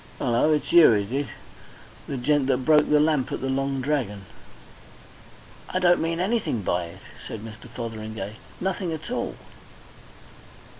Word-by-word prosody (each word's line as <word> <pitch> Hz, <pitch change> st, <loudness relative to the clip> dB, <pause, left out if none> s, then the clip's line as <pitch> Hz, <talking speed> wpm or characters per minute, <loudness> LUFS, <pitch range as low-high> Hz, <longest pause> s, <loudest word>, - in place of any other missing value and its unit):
"Hullo! 125 Hz, +5 st, +2 dB
it's 150 Hz, -2 st, 0 dB
you, 170 Hz, -8 st, +8 dB
is 100 Hz, 0 st, -1 dB
it? 140 Hz, +1 st, -1 dB, 0.8 s
The 135 Hz, -, -3 dB
gent 140 Hz, +2 st, +2 dB
that 130 Hz, -1 st, +1 dB
broke 150 Hz, -1 st, +5 dB
the 150 Hz, -, +5 dB
lamp 150 Hz, -4 st, +2 dB
at -, -, -2 dB
the 135 Hz, -, -3 dB
Long 135 Hz, 0 st, -1 dB
Dragon!" 125 Hz, -9 st, -2 dB, 1.4 s
"I -, -, -1 dB
don't 175 Hz, -1 st, +4 dB
mean 165 Hz, +1 st, -1 dB
anything 190 Hz, -, 0 dB
by 90 Hz, -1 st, 0 dB
it," 85 Hz, +3 st, -12 dB, 0.3 s
said 110 Hz, -, -6 dB
Mr. 110 Hz, +2 st, -10 dB
Fotheringay. 110 Hz, -3 st, -6 dB, 0.2 s
"Nothing 185 Hz, -1 st, -2 dB
at 160 Hz, +9 st, -6 dB
all." 250 Hz, -, -2 dB
135 Hz, 150 wpm, -25 LUFS, 110-155 Hz, 1.4 s, you